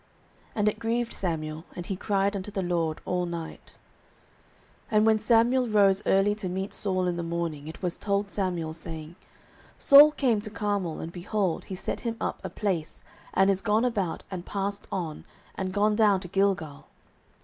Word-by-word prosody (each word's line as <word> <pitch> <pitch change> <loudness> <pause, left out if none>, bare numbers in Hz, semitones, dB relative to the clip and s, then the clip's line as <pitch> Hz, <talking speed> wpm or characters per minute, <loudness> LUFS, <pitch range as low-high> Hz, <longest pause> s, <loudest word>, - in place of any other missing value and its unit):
And 210 -1 +1
it 210 - 0
grieved 235 +1 -1
Samuel; 160 -3 -3
and 175 - -6
he 195 - -3
cried 200 +1 0
unto 195 +1 -4
the 200 -2 -3
LORD 170 -3 -1
all 180 -1 -1
night. 170 -2 -7 1.2
09:015:012 215 - +3
And 215 - +5
when 220 -1 +4
Samuel 235 +3 +3
rose 200 -2 +4
early 195 +2 +4
to 210 -3 -5
meet 190 +2 -3
Saul 185 -2 -1
in 175 -1 -1
the - - -2
morning, 165 -3 -3
it 160 - -9
was 175 -2 -1
told 200 -1 -1
Samuel, 175 -5 -2
saying, 160 0 -7 0.6
Saul 290 +2 +9
came 245 -8 +1
to 215 - -6
Carmel, 205 -6 -2
and, 165 - -6
behold, 185 0 -2
he 190 - -6
set 180 - -4
him 230 -1 -3
up - - -2
a - - -4
place, 180 -7 -3 0.3
and 195 +1 +5
is 195 -1 -1
gone 215 +3 +2
about, 200 -9 -1
and 180 -2 -5
passed 200 +1 -3
on, 170 -5 -4 0.3
and 190 -1 -3
gone 210 +2 +2
down 210 -3 +4
to 180 - -7
Gilgal. 180 -6 -1
195 Hz, 180 wpm, -27 LUFS, 170-210 Hz, 1.2 s, Saul